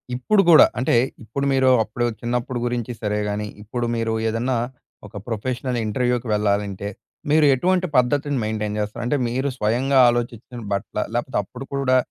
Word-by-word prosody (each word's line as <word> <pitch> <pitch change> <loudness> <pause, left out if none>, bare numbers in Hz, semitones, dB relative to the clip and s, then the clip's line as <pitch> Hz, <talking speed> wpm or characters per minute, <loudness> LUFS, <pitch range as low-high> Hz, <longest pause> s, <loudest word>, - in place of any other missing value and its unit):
ఇప్పుడు 195 - +3
గూడా 160 - +9
అంటే, 130 - +2 0.3
ఇప్పుడు 140 +6 -3
మీరు 130 -1 +4
అప్పుడు 115 +3 -3 0.2
చిన్నప్పుడు 120 +1 -2
గురించి 120 0 -2
సరే 105 -1 -1
గాని, 105 +1 -3 0.2
ఇప్పుడు 120 +3 -3
మీరు 115 -1 -1 0.2
ఏదన్నా 120 +3 -1 0.5
ఒక - - -17
ప్రొఫెషనల్ 125 +2 -2
ఇంటర్‌వ్యూ‌‌కి 125 +2 0
వెళ్లాలంటే, 100 -1 -1 0.4
మీరు 155 0 +5
ఎటువంటి 185 +6 +1
పద్ధతిని 140 +3 +1
మెయిన్‌టైన్ 105 -1 -2
జేస్తారు? 105 +3 -3
అంటే, 145 +4 +1
మీరు 130 +4 -1
స్వయంగా 125 +5 +2
ఆలోచిచ్చిన 120 0 -3
బట్టలా? 105 +1 -2
లేపోతే, 120 0 -1
అప్పుడు 125 +7 -10
కూడా 130 -2 +2
120 Hz, 150 wpm, -22 LUFS, 110-130 Hz, 0.5 s, గూడా